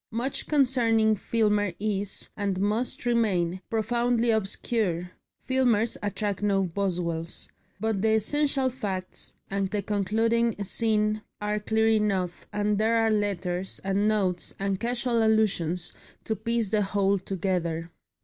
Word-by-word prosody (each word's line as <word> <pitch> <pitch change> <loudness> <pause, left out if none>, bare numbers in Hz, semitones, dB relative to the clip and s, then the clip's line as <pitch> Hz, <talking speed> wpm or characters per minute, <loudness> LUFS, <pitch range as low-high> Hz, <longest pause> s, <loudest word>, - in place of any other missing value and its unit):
Much 240 +4 -2
concerning 235 -6 +3
Filmer 210 -3 +1
is, 205 -1 -1
and 200 -2 -1
must 215 +6 -1
remain, 190 -7 +1
profoundly 235 +1 +1
obscure 195 -4 -1 0.4
Filmers 240 -4 +2
attract 205 -1 -2
no 200 -2 +2
Boswells 170 -3 -2 0.3
but 220 -2 0
the 220 0 +3
essential 275 +4 +2
facts 205 -8 -4 0.2
and 195 -1 0
the 205 0 -2
concluding 225 +3 +1
scene 215 0 +1 0.2
are 210 0 -1
clear 220 +1 +1
enough, 200 -5 0
and 210 0 0
there 225 +2 +3
are 225 -1 +3
letters, 190 -3 -1
and 195 +2 +1
notes, 190 -5 0
and 195 -1 -1
casual 240 0 0
allusions 190 -6 +1 0.3
to 220 - -1
piece 230 0 0
the 215 -1 +3
whole 200 0 +1
together. 175 -3 -2
210 Hz, 125 wpm, -27 LUFS, 195-225 Hz, 0.4 s, concerning